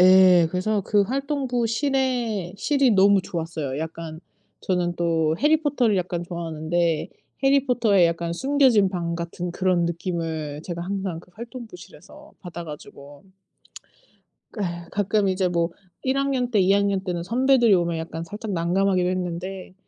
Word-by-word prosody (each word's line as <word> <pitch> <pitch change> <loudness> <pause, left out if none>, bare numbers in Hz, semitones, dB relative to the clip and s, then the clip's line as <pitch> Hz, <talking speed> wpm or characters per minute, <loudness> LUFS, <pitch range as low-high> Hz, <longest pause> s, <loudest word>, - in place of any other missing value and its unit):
예. 185 -2 +7
그래서 200 +4 0
그 205 +1 +2
활동부 260 0 -1
실의 235 -7 -1
실이 275 +4 +2
너무 200 0 +5
좋았어요. 160 -6 -4
약간 160 0 -6 0.4
저는 175 -2 -1
또 165 -2 +1
해리 310 +1 +3
포터를 250 -8 +2
약간 175 -1 -3
좋아하는데 170 -1 -1 0.4
해리 275 0 +4
포터의 215 -8 +4
약간 170 0 -2
숨겨진 260 -3 +3
방 170 -2 -3
같은 170 +1 -4
그런 180 -2 +1
느낌을 165 -3 -3
제가 170 -1 -5
항상 190 -3 -3
그 180 - -21
활동부실에서 235 +6 -11
받아 175 -2 -7
가지고. 145 -1 -11 1.3
그 210 - -6
예 170 -1 -4
가끔 205 0 +1
이제 185 0 +1
뭐 170 -1 0 0.3
1 265 +1 0
학년 270 -3 0
때 215 -4 +2
2 190 +1 +4
학년 200 -1 +1
때는 175 -3 -3
선배들이 240 0 +3
오면 170 -2 0
약간 165 0 -5
살짝 210 +4 -6
난감하기도 180 +2 +1
했는데 185 +1 -4
185 Hz, 305 characters per minute, -24 LUFS, 170-225 Hz, 1.3 s, 예